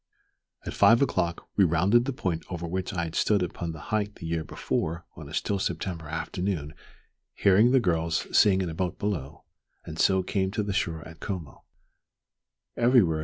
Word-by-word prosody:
At - - -4
five 115 +1 +6
o'clock 85 -10 -1
we 100 - +6
rounded 95 +8 +3
the 140 - -1
point 90 -10 -2
over 85 -2 -4
which 95 +2 -3
I 90 -4 -2
had 80 -1 -5
stood 100 -3 +2
upon 85 -1 -4
the 80 - -9
height 105 -1 0
the - - -9
year 80 -1 -1
before 85 +2 -3
on - - -10
a - - -10
still 100 -1 0
September 85 -3 -3
afternoon 80 0 -3 0.6
hearing 105 +4 +5
the 130 +1 +5
girls 85 -6 0
sing 95 -2 +5
in 90 - -3
a - - -6
boat 90 +1 -2
below, 80 -9 -3 0.4
and 80 +1 -7
so 95 -1 +3
came 95 0 0
to 105 - 0
the 100 -1 -2
shore 80 -4 -2
at 80 0 -13
Como. 90 -8 -6
90 Hz, 175 wpm, -27 LUFS, 80-100 Hz, 0.6 s, five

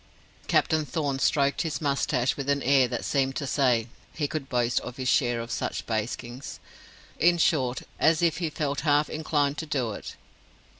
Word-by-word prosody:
Captain 155 -1 +2
Thorn 145 -2 -2
stroked 140 0 +2
his 150 -4 -2
moustache 135 -3 0
with 140 0 -4
an 140 -1 +1
air 135 -1 +4
that - - -4
seemed 135 -1 0
to 145 - -2
say 125 -4 +2 0.3
he 150 -2 -1
could 145 -3 -5
boast 120 -1 +1
of 125 - -8
his 130 -1 -3
share 120 -2 +2
of 115 0 -6
such - - -3
baskings: 120 +3 -4 0.6
in 175 +2 +4
short, 130 -6 +1 0.2
as 160 +1 +3
if 165 -2 +2
he 170 -3 -1
felt 145 -2 -2
half 145 0 +2
inclined 150 -2 0
to 160 - -5
do 130 -7 -1
it. - - -8
140 Hz, 180 wpm, -27 LUFS, 125-150 Hz, 0.6 s, air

